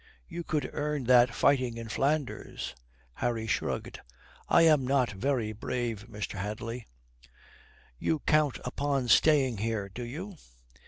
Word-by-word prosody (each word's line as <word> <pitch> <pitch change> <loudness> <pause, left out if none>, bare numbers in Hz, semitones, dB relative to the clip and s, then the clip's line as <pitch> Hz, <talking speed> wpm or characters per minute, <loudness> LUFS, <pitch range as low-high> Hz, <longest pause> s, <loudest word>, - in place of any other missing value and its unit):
"You 170 -1 -5
could 155 -2 -1
earn 150 -1 -2
that 125 0 +6
fighting 130 -4 +2
in 115 -1 -6
Flanders." 140 +4 -2 0.4
Harry 115 - -1
shrugged. - - -2 0.5
"I - - +6
am 150 -5 +5
not 130 -2 +2
very 115 +1 -1
brave, 115 0 -3
Mr. 105 -1 -5
Hadley." 110 +4 -5 1.1
"You 160 - +1
count 150 -3 +2
upon 135 0 -1
staying 135 -6 +4
here, 110 -2 -2
do 120 +6 -7
you?" 170 +11 -7
125 Hz, 125 wpm, -29 LUFS, 115-145 Hz, 1.1 s, that